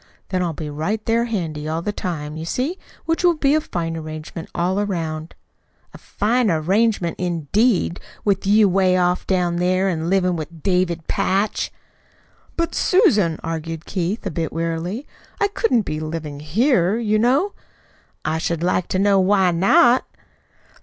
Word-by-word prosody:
Then 185 -1 0
I'll 175 -2 0
be 155 0 -6
right 195 +9 -2
there 230 +1 +2
handy 165 -9 -3
all 160 +2 -2
the 210 - -1
time, 155 -7 -4
you 160 - -5
see, 265 - -2 0.3
which 330 +2 0
will 350 -1 +5
be 285 -2 +2
a 310 - +3
fine 165 - -3
arrangement 155 +1 -7
all 180 +3 0
around." 165 -5 -3 0.6
"A - - -11
fine 230 +2 0
arrangement, 185 +3 +1
indeed 180 - +1 0.3
with 195 -1 +1
you 210 +1 +5
'way 185 -1 +3
off 180 0 +1
down 180 -2 +1
there, 185 +2 +2
an' 165 -2 -2
livin' 185 -2 +2
with 160 0 -7
David 180 -4 0
Patch!" 200 +3 0 0.9
"But, 335 0 0
Susan," 215 - +3
argued 165 0 -4
Keith, 190 +4 -2
a 195 - -2
bit 160 0 -2
wearily, 165 - -3 0.3
"I 405 - +2
couldn't 260 - +1
be 155 -4 -4
living 155 -2 -5
here, 190 - +2
you 215 -2 +1
know." 270 - +2 0.7
"I 160 +1 0
should 170 0 -2
like 180 0 +1
to - - -1
know 200 0 +4
why 190 -1 +3
not." 200 +8 +4
180 Hz, 160 wpm, -21 LUFS, 165-215 Hz, 0.9 s, will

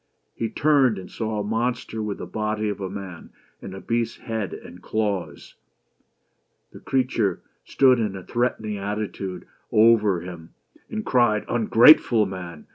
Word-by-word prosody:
He 115 - -3
turned, 135 -4 +3
and 90 -1 -9
saw 110 -2 -3
a - - -2
monster 115 +1 -2
with 105 -2 -3
the - - -6
body 105 +3 -2
of 100 -1 -5
a 95 - -3
man 95 -4 -8 0.3
and 95 - -8
a - - -7
beast's 115 +2 -2
head 110 -4 -4
and 90 - -11
claws. 105 -4 -3 1.2
The - - -12
creature 125 -6 -1 0.2
stood 130 -3 +4
in 105 -4 -1
a 95 - -8
threatening 110 -3 -2
attitude 100 -2 -5 0.3
over 105 -5 +4
him 85 -2 -10 0.3
and 215 -1 -4
cried: 120 -4 +2
"Ungrateful 115 0 +5
man! 90 -5 -8
105 Hz, 145 wpm, -24 LUFS, 95-115 Hz, 1.2 s, Ungrateful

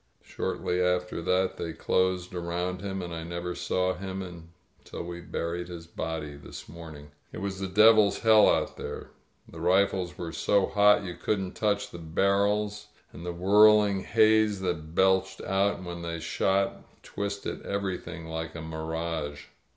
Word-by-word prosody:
Shortly 90 0 -2
after 90 -1 0
that 90 +2 +1
they 80 - -4
closed 90 +2 0
around 90 +1 -3
him, 95 -2 -4
and 85 -1 -6
I 80 - -4
never 85 +1 -4
saw 90 +1 0
him 95 +1 -5
until 85 -2 -11
we 85 0 -7
buried 85 0 -4
his 85 -2 -8
body 80 -3 -5
this 70 - -10
morning. 80 -2 -10
• - - -15
• - - -21
• - - -27 0.2
It - - -8
was 95 0 -4
the 95 - -2
devil's 110 +2 +6
hell 110 -2 +6
out - - 0
there. - - -7 0.4
The - - -11
rifles 95 -1 +2
were 85 -2 -5
so 100 +4 +2
hot 105 0 +4
you 90 -2 -5
couldn't 95 -1 -2
touch 105 -2 0
the 85 - -8
barrels, 100 +5 +1 0.3
and 85 - -9
the 90 - -3
whirling 105 +2 +5
haze 110 0 +3
that 85 -3 -3
belched 95 0 +3
out 95 -1 0
when 85 -1 -6
they 85 -1 -4
shot 95 +4 -1
twisted 100 0 -4
everything 90 -4 -4
like 80 0 -5
a 80 - -5
mir 80 0 -5
age. 80 -3 -4
90 Hz, 165 wpm, -28 LUFS, 85-100 Hz, 0.4 s, devil's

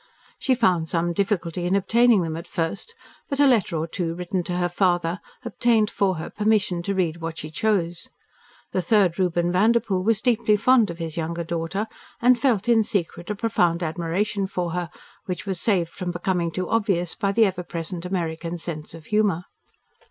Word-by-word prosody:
She 260 - +2
found 180 -9 +2
some 170 0 0
difficulty 180 -3 -1
in 185 - +2
obtaining 220 +1 +4
them 160 -1 -3
at 165 - -7
first, 195 - -3 0.3
but 275 - -2
a 290 - +6
letter 225 -10 +3
or 155 - -1
two 165 0 -3
written 180 +1 -2
to 175 - -2
her 175 0 +1
father 175 -1 +1 0.3
obtained 230 -2 +2
for 195 -2 +1
her 160 - -6
permission 210 -4 +1
to 200 +3 -2
read 170 -3 0
what 165 -1 -5
she 155 - -6
chose. 175 -3 -1 0.6
The 185 - 0
third 185 -1 +2
Reuben 175 -1 +1
Vanderpoel 200 -1 +2
was 220 0 +2
deeply 230 -4 +3
fond 230 -1 +4
of 170 - -6
his 165 -2 -5
younger 170 +1 -2
daughter, 170 +5 -2 0.3
and 250 +1 +5
felt 235 -6 +1
in 230 -2 +5
secret 200 -5 -3
a 210 - -1
profound 175 -6 +1
admiration 175 +5 -1
for 180 -3 -3
her, 175 -1 -3 0.4
which 180 +1 -4
was 190 -3 -3
saved 180 -6 +1
from 180 -2 -5
becoming 175 0 -1
too 185 +2 -3
obvious 195 -6 0
by 200 -3 -1
the 225 +2 +4
ever 190 -2 -1
present 170 0 -5
American 170 -2 -3
sense 160 -2 -6
of 160 -2 -12
humour. 205 -4 +1
180 Hz, 185 wpm, -24 LUFS, 170-210 Hz, 0.6 s, a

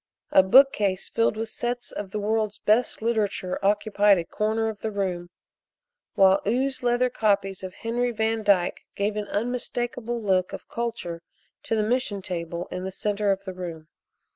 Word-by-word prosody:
A - - +7
bookcase 205 -3 +4
filled 230 -1 +1
with 225 0 -3
sets 240 +2 -3
of 205 -2 -6
the 210 - -4
world's 215 0 0
best 220 +1 +1
literature 210 -6 -1
occupied 205 0 +3
a 170 - -2
corner 220 +4 -1
of 220 -2 -5
the 220 - -2
room, 185 -4 -3 0.9
while 195 0 +5
ooze 260 +4 0
leather 245 +1 +2
copies 200 -4 +1
of 185 -1 -7
Henry 240 +2 -1
Van 225 -1 0
Dyke 195 -4 +2
gave 205 +1 -1
an 210 -1 -3
unmistakable 240 +1 -2
look 190 -4 +1
of - - -8
culture 225 -8 -4 0.4
to 225 - -1
the 215 - +1
mission 215 -4 0
table 170 -1 -4
in 180 0 -4
the 190 - -3
center 205 +1 0
of 195 0 -2
the 190 - -5
room. 165 -4 -7
210 Hz, 165 wpm, -25 LUFS, 190-230 Hz, 0.9 s, A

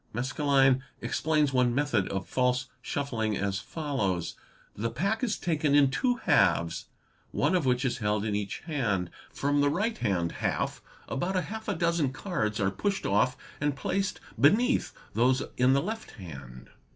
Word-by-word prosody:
Maskelyne 135 +1 +3 0.2
explains 150 -3 +1
one 125 -2 +3
method 145 -9 +1
of 95 -1 -3
false 125 0 +1 0.2
shuffling 115 -6 -2
as 100 -1 -1
follows 105 - -2 0.2
:— - - -31
"The 115 +3 -1
pack 200 - -1
is 225 -4 0
taken 150 -4 +1
in 140 -2 +5
two 245 - +1
halves, 90 - +2 0.4
one - - +1
of 175 -7 +2
which 125 +1 +2
is 125 -1 -1
held 105 -1 0
in 105 -2 0
each 105 -1 -3
hand. 110 - -1 0.2
From 145 +1 +1
the 145 - +4
right 215 +9 -1
hand 90 -7 0
half - - -2 0.3
about 175 +8 -2
half 220 +4 -3
a 205 - 0
dozen 170 -5 +1
cards 135 - -2
are 95 -2 +2
pushed 195 - -2
off 105 +6 +2 0.2
and 145 -1 0
placed 195 +7 -1 0.2
beneath 220 - +4 0.2
those 125 +3 +3
in 125 +1 +4
the 140 - +2
left 220 +4 -4
hand. 70 - -10
135 Hz, 165 wpm, -29 LUFS, 105-160 Hz, 0.4 s, in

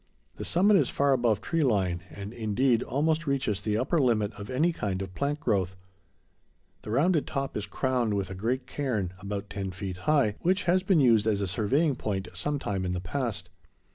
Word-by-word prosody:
The - - -5
summit 195 +4 +4
is - - +2
far 140 -1 +2
above 120 -5 +2
tree 165 -1 0
line 95 -9 +1
and, 100 +2 -8
indeed, 115 +2 +1
almost 155 +4 0
reaches 135 -8 0
the 105 -1 0
upper 145 +7 +1
limit 110 -5 +1
of 100 0 -9
any 155 +7 +2
kind 100 -9 -2
of 95 -1 -6
plant 145 +5 -1
growth. 95 - 0 1.1
The - - -9
rounded 150 +7 +2
top 135 -2 -3
is 105 -1 -3
crowned 120 0 0
with 100 -1 -2
a - - -4
great 120 +7 -2
cairn, 120 -10 -2
about 100 0 -5
ten 100 -2 -3
feet 95 0 -5
high, 135 -9 +3
which 185 +3 +1
has 180 +2 +3
been 185 -4 +3
used 115 -4 +4
as 105 -2 +2
a 100 - 0
surveying 130 - +1
point 95 -6 -3
some 145 0 -1
time 100 -8 -2
in 90 0 -1
the 90 - -2
past. 100 -1 -3
115 Hz, 200 wpm, -28 LUFS, 100-140 Hz, 1.1 s, summit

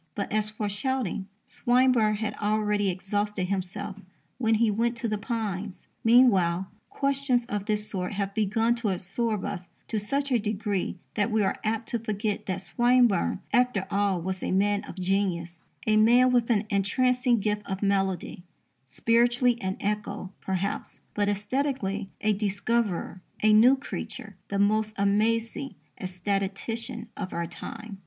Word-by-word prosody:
But, 200 - -3
as 215 0 +1
for 215 0 -3
shouting, 210 -2 -2 0.2
Swinburne 245 -3 +3
had 215 0 -2
already 210 -1 +1
exhausted 195 +1 -2
himself 195 +1 -3 0.4
when 225 -2 +3
he 220 0 +3
went 235 +3 0
to 235 0 -2
the 215 -1 -1
Pines. 205 -4 -4 0.2
Meanwhile, 195 -7 +4 0.2
questions 275 -3 +1
of 205 -4 -4
this 210 -1 0
sort 185 0 -3
have 200 -1 -2
begun 220 +3 +2
to 230 -3 -1
absorb 195 +4 -1
us 180 -2 -5 0.2
to 220 - 0
such 275 +7 -1
a 245 - +4
degree 205 -3 -2 0.2
that 210 +2 +1
we 215 -1 +2
are 190 - 0
apt 225 +1 -1
to 235 - -1
forget 215 -1 -2
that 185 -1 -2
Swinburne 240 -3 +3
after 245 -6 +3
all 200 -2 +1
was 185 +2 -4
a - - -2
man 205 +2 +2
of - - -9
genius 180 -3 -1 0.2
a 215 -1 +3
man 240 +4 +6
with 245 -1 +2
an 220 -3 +2
entrancing 245 +5 +2
gift 210 +1 0
of 190 +1 -3
melody 195 -3 0 0.5
spiritually 240 - +2
an 190 0 -2
echo, 205 -2 -3
perhaps, 190 +1 -3
but 205 -1 +1
aesthetically 210 -2 -1
a 215 0 +3
discoverer, 200 -2 -1 0.2
a 215 0 +6
new 240 +5 +7
creature, 220 -5 -7
the 200 - -2
most 215 +2 +2
amazing 225 +6 +1 0.3
ecstatician 200 +5 -3
of 185 -2 -5
our 170 - -1
time. 215 +4 -8
210 Hz, 150 wpm, -27 LUFS, 195-230 Hz, 0.5 s, new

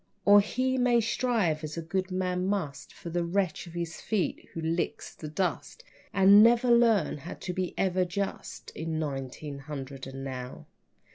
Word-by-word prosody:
Or 205 0 +8
he 255 +5 -1
may 245 -1 +4
strive, 220 -9 0
as 155 +1 -5
a - - -2
good 185 +3 -2
man 185 0 -1
must, 185 -9 -3
For 170 - -9
the 175 +1 0
wretch 180 0 -1
at 170 - -11
his 170 -1 -5
feet 215 -5 -2
who - - -6
licks 165 +1 -2
the 155 - -8
dust, 185 - -3 0.3
And 200 +1 +7
never 240 +2 +5
learn 230 -10 +4
how 160 - -7
to 180 - -5
be 185 -1 -3
even 185 -1 +1
just 195 +3 -5
In 160 0 -4
nineteen 140 -1 -4
hundred 135 -2 -7
and 135 0 -7
now. 130 -2 -6
180 Hz, 170 wpm, -28 LUFS, 155-200 Hz, 0.3 s, Or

